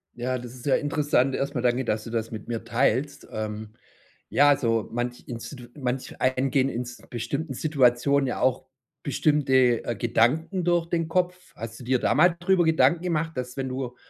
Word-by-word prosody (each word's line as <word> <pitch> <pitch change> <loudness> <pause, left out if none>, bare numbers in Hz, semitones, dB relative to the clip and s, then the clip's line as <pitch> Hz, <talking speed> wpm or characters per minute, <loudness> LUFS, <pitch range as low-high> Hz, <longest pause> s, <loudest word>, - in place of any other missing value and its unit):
Ja, 125 +2 -2
das 120 0 -9
ist 125 - -12
ja 140 - +4
interessant. 145 -3 +1
Erst 140 +2 -2
mal 125 - 0
danke, 125 +1 +1
dass 110 -1 -1
du - - -8
das 115 -1 -3
mit 110 -2 -7
mir 115 -1 -3
teilst. 130 +4 0
Ähm. 110 0 -5 0.6
Ja, 145 - +5
also 115 -6 +2
manch 120 +1 -3
institu 120 +1 -8
manch 130 -2 -4
einem 130 +1 +1
gehen 135 -1 +2
ins 120 -1 -5
bestimmten 135 +5 -3
Situationen 140 -1 +2
ja 125 - -3
auch 130 0 +1 0.4
bestimmte, 135 -4 +2
äh, 120 - -2
Gedanken 130 - +1
durch 175 -1 +2
den 165 -1 -1
Kopf. 180 +2 +1 0.2
Hast 115 +1 -7
du - - -10
dir 130 +2 +2
da - - +2
mal 175 +2 +4
drüber 180 +1 +3
Gedanken 160 0 +3
gemacht, 165 -2 -1
dass 125 0 -5
wenn 135 -1 -2
du 130 -1 -4
130 Hz, 185 wpm, -25 LUFS, 120-145 Hz, 0.6 s, Ja